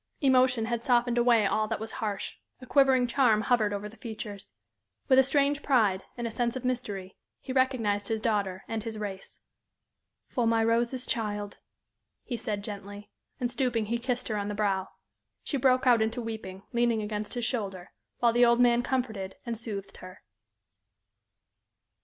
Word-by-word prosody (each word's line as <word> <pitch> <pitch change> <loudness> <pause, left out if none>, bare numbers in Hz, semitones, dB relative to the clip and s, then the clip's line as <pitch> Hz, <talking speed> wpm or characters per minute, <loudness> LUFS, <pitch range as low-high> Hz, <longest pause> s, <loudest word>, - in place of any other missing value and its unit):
Emotion 255 -4 +3
had 235 0 -2
softened 240 0 +2
away 235 -3 +4
all 215 +2 +1
that 225 -1 -2
was 220 +1 -5
harsh; 210 -5 -3 0.3
a 255 - -11
quivering 265 -2 +4
charm 240 -3 +3
hovered 220 -3 +2
over 205 0 -3
the 220 +2 -14
features. 215 -3 -7 0.5
With 260 -1 +6
a - - +7
strange 285 +1 +2
pride, 215 -10 +2
and 240 - -3
a 230 - -2
sense 235 +1 -1
of 260 -1 -5
mystery, 205 -7 -3 0.2
he 260 - -6
recognized 230 -6 +1
his 220 -1 -1
daughter 200 -4 -1
and 225 -1 -3
his 225 0 -6
race. 200 -2 -6 0.9
"For 240 -3 0
my 225 0 +3
Rose's 235 +3 +1
child," 205 -2 -3 0.6
he 245 - -4
said, 210 -4 -3
gently, 205 0 -8 0.3
and, 245 -2 -1
stooping, 240 -4 0
he 235 +3 -1
kissed 250 0 -2
her 215 - -1
on 200 0 -2
the 205 - -3
brow. 195 -2 0 0.6
She 285 - -2
broke 255 0 +3
out 240 -3 +5
into 225 +3 0
weeping, 220 -5 -6
leaning 235 -2 +2
against 210 +1 -4
his 240 -1 -1
shoulder, 195 -7 -3 0.3
while 235 -1 +3
the 240 +1 +4
old 235 0 +5
man 240 -1 +5
comforted 225 -7 -2
and 235 -1 -2
soothed 205 -3 -6
her. 185 0 -12
230 Hz, 170 wpm, -28 LUFS, 210-245 Hz, 0.9 s, a